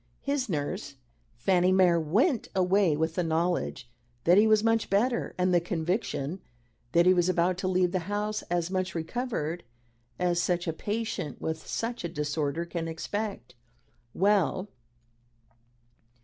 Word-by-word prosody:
His 280 -4 -1
nurse, 145 -5 -3 0.4
Fanny 180 +9 +2
Mere, 180 -3 +4
went 220 - +1
away 185 -3 +3
with 160 +1 0
the 180 - 0
knowledge 165 -6 -1 0.4
that 175 - +5
he 210 +3 +6
was 215 -1 +4
much 225 0 +2
better, 235 +5 +1
and 180 0 +2
the 175 - +4
conviction 175 -1 -2 0.5
that 170 0 +5
he 185 - +7
was 175 0 +2
about 180 0 +2
to 185 - -1
leave 185 -1 +2
the 185 - 0
house 210 +1 -1
as 175 0 -1
much 185 -1 -2
recovered 170 -2 -3 0.5
as 175 -1 +1
such 175 0 0
a 165 - 0
patient 210 - -3
with 160 0 -4
such 235 -1 -3
a 170 - -2
disorder 150 +1 -2
can 170 -1 -4
expect." 195 - -4 0.6
"Well?" 200 0 +2
180 Hz, 145 wpm, -28 LUFS, 165-205 Hz, 0.6 s, he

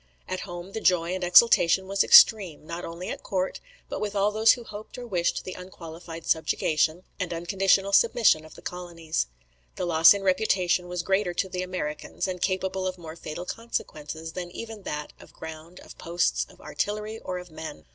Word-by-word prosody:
"At 185 - -3
home, 175 +2 -7
the 220 - -5
joy 175 -1 +2
and 185 0 -3
exultation 190 -1 +6
was 195 0 +2
extreme; 190 -10 +6
not 170 +2 -6
only 170 +2 -6
at - - -5
court, 185 -1 -2 0.3
but - - -5
with 205 -1 -3
all 200 +1 +2
those 220 +1 +5
who 245 - -7
hoped 215 +1 -10
or 245 - -7
wished 180 -7 -1
the 185 - -6
unqualified 165 -2 -10
subjugation, 160 +1 +1 0.2
and 185 -2 -2
unconditional 195 +3 +1
submission 225 - +4
of 155 - -14
the - - -14
colonies. 170 - -3 0.5
The - - -2
loss 165 +2 +7
in 200 - -4
reputation 185 -2 +1
was 180 -1 -3
greater 190 -1 0
to 190 - 0
the 180 0 -3
Americans, 180 -5 -4
and 180 -1 -4
capable 190 0 -1
of 185 0 -4
more 160 -2 -9
fatal 170 +1 -7
consequences, 160 -8 -5
than 180 -1 -5
even 220 +3 -8
that 150 0 -5
of - - -16
ground, 160 +2 -10
of - - -14
posts, 170 +1 0
of - - -18
artillery, 215 +1 -3
or 185 - -5
of 180 -1 -9
men. 155 - -8
180 Hz, 185 wpm, -26 LUFS, 165-195 Hz, 0.5 s, loss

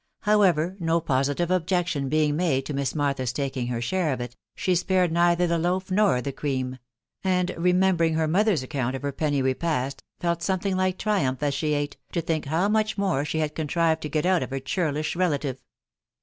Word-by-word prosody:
How 210 0 +3
ever, 175 -1 +2
no 165 -1 +1
positive 145 +3 0
objection 175 -5 0
being 150 0 +2
made 150 -6 +1
to 150 - -4
Miss 140 +1 -2
Martha's 140 -4 0
taking 130 -2 -3
her 120 -1 -2
share 165 +6 0
of 130 - -5
it, 120 0 -6 0.2
she 185 - 0
spared 180 0 +2
neither 170 +1 +3
the 170 -1 +1
loaf 185 +3 -1
nor 185 - +3
the 140 - -2
cream; 130 -2 -3 0.4
and 185 -1 +1
remembering 180 -1 +2
her 160 0 +1
mother's 190 -2 +2
account 130 -1 -2
of 135 - -6
her 140 - -1
penny 145 -2 0
repast, 130 0 -1 0.2
felt 170 -1 -1
something 190 +1 0
like 185 0 0
triumph 150 -11 0
as 145 -1 +1
she 150 +2 0
ate, 145 0 -3 0.2
to 170 - 0
think 160 -1 -2
how 165 +7 +1
much 215 0 +1
more 190 -8 +1
she 150 - -3
had 155 -1 -1
contrived 160 +1 0
to 150 - -4
get 155 +2 0
out 185 -1 +3
of - - -3
her 135 0 -3
churlish 150 +2 -1
relative. 145 -7 -1
160 Hz, 200 wpm, -25 LUFS, 140-180 Hz, 0.4 s, How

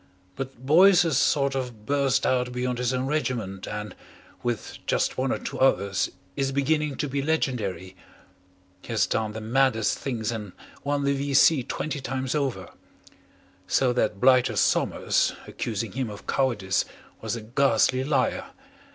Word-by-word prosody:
But 130 0 -7
Boyce 180 +5 +6
has 160 -6 +1
sort 140 -1 +2
of 125 -5 -5
burst 140 -1 +1
out 125 -1 +1
beyond 125 0 -2
his 125 -1 0
own 130 0 -1
regiment 120 -10 -2
and, 105 0 -5 0.5
with 120 -2 -4
just - - +1
one 130 0 0
or - - 0
two - - -6
others, 100 -7 +2 0.3
is 135 -1 0
beginning 145 +1 0
to 150 - -2
be 140 +1 -2
legendary. 105 - -2 0.9
He - - -15
has 115 -2 +2
done 110 -1 -1
the 110 - -5
maddest 115 -1 +1
things 120 -5 -2
and 105 -5 -6 0.3
won 145 0 0
the 140 0 +2
V.C. 140 +1 +4
twenty 150 +1 -3
times 130 0 -3
over. 140 -4 -2 1.0
So 125 -2 +2
that 110 -4 0
blighter 130 0 +4
Somers, - - +2
accusing 110 -2 -4
him 130 0 -3
of 105 -1 -10
cowardice, 110 -8 +1 0.4
was - - -2
a 115 - -6
ghastly 130 +2 +2
liar. 135 -2 0
130 Hz, 150 wpm, -26 LUFS, 110-140 Hz, 1.0 s, Boyce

